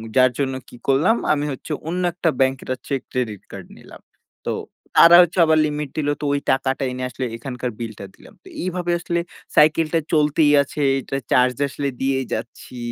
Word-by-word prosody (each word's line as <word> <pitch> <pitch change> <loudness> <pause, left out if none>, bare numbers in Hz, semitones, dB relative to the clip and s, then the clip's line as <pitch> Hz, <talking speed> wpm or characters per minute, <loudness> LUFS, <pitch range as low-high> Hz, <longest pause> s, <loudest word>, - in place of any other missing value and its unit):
যার 130 -1 +5
জন্য 135 -1 0 0.2
কি - - -13
করলাম? 145 - +3 0.2
আমি 145 0 -1
হচ্ছে 135 +4 -8 0.2
অন্য 180 +2 -2
একটা 175 -1 0
bank 130 0 +3
একটা 130 0 -3
check 135 -3 -1
credit 110 -6 -3
card - - -9
নিলাম। - - -14 0.4
তো - - -1 0.4
তারা 170 +1 +9
হচ্ছে 175 +1 +1
আবার 160 0 +3
limit 150 -1 -4
দিলো। 145 -1 0
তো - - -2
ওই 140 - +1
টাকাটা 135 +1 0
এনে 125 0 -5
আসলে 125 +2 -4
এখানকার 125 +1 -5
bill 115 -2 -5
টা 100 - -7
দিলাম। - - -17
তো - - -16
এইভাবে 180 -1 -2
আসলে 170 0 -2 0.4
cycle 155 +1 +4
টা 165 - +4
চলতেই 150 0 +3
আছে, 145 +1 -5 0.2
এইটার 135 +1 -3
charge 125 0 +3
আসলে 140 +1 -4
দিয়েই 135 0 0
যাচ্ছি। 120 +2 -7
140 Hz, 190 wpm, -21 LUFS, 130-155 Hz, 0.4 s, তারা